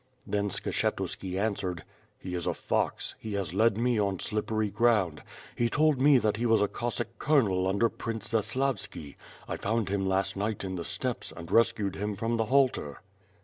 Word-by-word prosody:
^' - - -39 0.2
Then 100 0 0
Skshetuski 95 0 -2
answered. 95 -5 -2 0.3
"He 90 - -7
is 85 -1 -3
a - - 0
fox; - - -1
he 110 - -6
has 95 -5 -2
led 110 +1 +3
me 120 -1 +2
on 100 -3 0
slippery 110 0 -1
ground. 105 -10 +2 0.3
He 120 0 +1
told 150 0 +2
me 140 0 +7
that 105 -3 +1
he 120 +2 0
was 115 -1 +4
a 105 - +3
Cossack 120 +1 -4
Colonel 100 -11 +3
under 100 +5 +3
Prince 115 -2 -4
Zaslavski. 115 - -1 0.3
I - - -3
found 110 -1 -1
him 95 -1 0
last 95 0 +1
night 105 +1 -2
in 95 -1 -3
the 85 -2 -3
steppes, - - -2
and 85 0 -9
rescued 115 -4 +2
him 105 +1 -2
from 115 +3 -1
the 115 - +1
halter." 130 - +1
105 Hz, 185 wpm, -29 LUFS, 95-115 Hz, 0.3 s, me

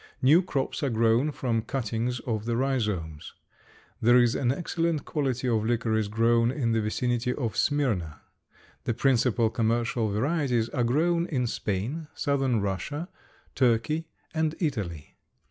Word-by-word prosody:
New 150 +7 +6
crops 140 -7 -2
are 140 - +1
grown 115 +5 +2
from 120 -5 -1
cuttings 120 0 -2
of 110 -3 -3
the 115 0 0
rhizomes. 105 - -2 0.7
There 120 +2 +6
is 120 -1 +4
an 125 -3 +1
excellent 165 0 -1
quality 130 -4 -1
of 110 -3 +1
licorice 110 -2 0
grown 115 +2 +3
in 125 -3 -1
the 115 0 +2
vicinity 120 +3 -1
of 115 -6 -3
Smyrna. 100 - 0 0.7
The 120 - 0
principal 120 -4 +2
commercial 115 0 0
varieties 125 0 0
are 125 - -1
grown 170 +8 +1
in 130 -5 -1
Spain, 115 - -3
southern 135 -6 +1
Russia, 100 - -3 0.4
Turkey 130 +6 +1 0.3
and 160 -1 0
Italy. 100 - -3
120 Hz, 135 wpm, -27 LUFS, 110-140 Hz, 0.7 s, New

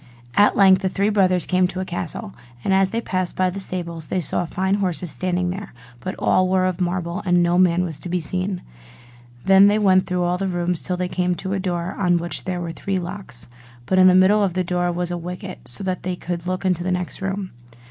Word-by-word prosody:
At 205 +1 +4
length 190 -1 +6
the 190 - 0
three 200 +2 +1
brothers 185 -4 +2
came 185 0 +2
to 185 - -6
a 185 - -2
castle: 185 +4 -5 0.3
and 195 - +1
as 190 0 +3
they 230 +3 -2
passed 185 -4 -2
by 185 -1 +1
the 195 - -6
stables 170 -4 -4
they 185 - -1
saw 175 +1 -1
fine 190 +3 -1
horses 180 -3 -1
standing 180 +5 -1
there, 195 -5 -7 0.2
but 185 - -5
all 185 0 +2
were 185 0 +2
of 185 0 -1
marble, 175 +1 -2
and 175 -2 +3
no 175 +1 +2
man 180 -1 +4
was 165 -4 -3
to 180 - -5
be 180 +1 0
seen. 185 +3 -3 0.8
Then 195 +1 +7
they 205 +1 +3
went 190 -3 +3
through 180 -1 0
all 175 +1 0
the 195 - -1
rooms, 175 -1 -1
till 180 - -2
they 180 0 -1
came 180 0 0
to 190 +2 -4
a 195 - -1
door 175 -1 -2
on 175 -2 +3
which 170 0 -3
were 175 -2 -3
three 195 +3 -3
locks: 175 - -5 0.4
but 185 +9 +2
in 185 - +8
the 185 - +6
middle 190 +3 +5
of 195 -4 +1
the 185 - +1
door 175 0 0
was 175 0 -2
a 175 - -3
wicket, 180 -1 -7
so 125 +10 -3
that 185 -2 -2
they 185 0 -3
could 175 -1 -5
look 185 +1 -2
into 180 -2 +1
the 185 - -1
next 180 0 -3
room. 195 0 -3
185 Hz, 240 wpm, -22 LUFS, 175-190 Hz, 0.8 s, in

